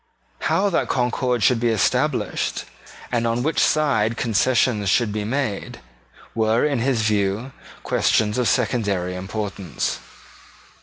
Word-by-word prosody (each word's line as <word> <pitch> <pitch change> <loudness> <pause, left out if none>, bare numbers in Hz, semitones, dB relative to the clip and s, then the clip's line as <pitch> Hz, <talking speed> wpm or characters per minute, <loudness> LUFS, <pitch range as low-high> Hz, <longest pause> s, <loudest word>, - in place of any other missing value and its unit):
How 200 +1 +1
that - - +1
concord 125 -1 0
should 120 +4 +4
be 120 0 +1
established, 110 -4 0 0.5
and 120 -1 +1
on 115 +1 0
which 160 +3 0
side 115 -8 +2
concessions 115 -2 +1
should 115 0 +2
be 105 -1 -2
made, 120 -2 -3 0.5
were, 110 +2 +2
in 140 -4 0
his 120 -2 +1
view, 105 +3 0 0.3
questions 105 +2 +1
of 125 - +2
secondary 100 -7 0
importance. 95 -2 -4
115 Hz, 120 wpm, -22 LUFS, 105-125 Hz, 0.5 s, should